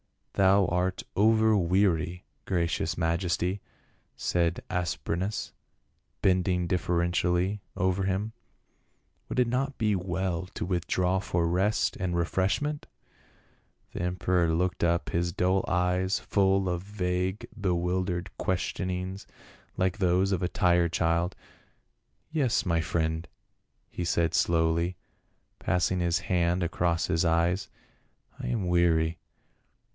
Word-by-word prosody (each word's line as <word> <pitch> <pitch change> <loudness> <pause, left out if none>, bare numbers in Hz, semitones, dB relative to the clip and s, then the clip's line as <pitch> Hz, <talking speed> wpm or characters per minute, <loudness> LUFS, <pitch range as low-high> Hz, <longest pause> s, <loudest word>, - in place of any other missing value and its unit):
"Thou 95 0 +4
art 90 +1 -1
over 110 +1 +4
weary, 90 -2 +1 0.2
gracious 85 -2 -1
majesty," 90 +3 0 0.5
said 85 0 0
As 90 -2 0
prenas, 95 +5 -3 0.7
bending 90 -1 +2
deferentially 90 +2 0 0.2
over 95 +1 +1
him. 100 +4 -1 1.0
"Would - - -4
it 125 - +4
not 135 +3 -1
be 105 -3 +2
well 90 -1 -2
to - - -3
withdraw 90 +1 0
for 85 -3 0
rest 95 +5 +1
and 90 -2 -2
refreshment 95 - 0 0.5
?" - - -37
The - - -4
emperor 90 -1 +1
looked 90 +2 0
up, 85 0 +1
his 85 +1 0
dull 95 +3 +1
eyes 90 +2 +1
full 95 -1 +2
of 90 -1 -1
vague 95 +1 -2
bewildered 90 -1 -1
questionings 95 +1 -2 0.5
like 95 +2 0
those 95 +1 +2
of 95 - 0
a 90 - +1
tired 85 -3 +2
child. 85 +3 +1 0.5
" - - -46
Yes, 140 -7 +1
my 85 -2 +2
friend," 80 0 -1 0.6
he 90 - -4
said 85 -1 +1
slowly, 85 +1 +2 0.6
passing 90 0 +1
his 85 -1 +2
hand 90 0 +1
across 85 -1 0
his 80 +1 +1
eyes. 85 +3 +1 0.3
" - - -36
I - - -4
am 110 -6 -1
weary. 85 -2 +2
90 Hz, 120 wpm, -28 LUFS, 85-95 Hz, 1.0 s, Thou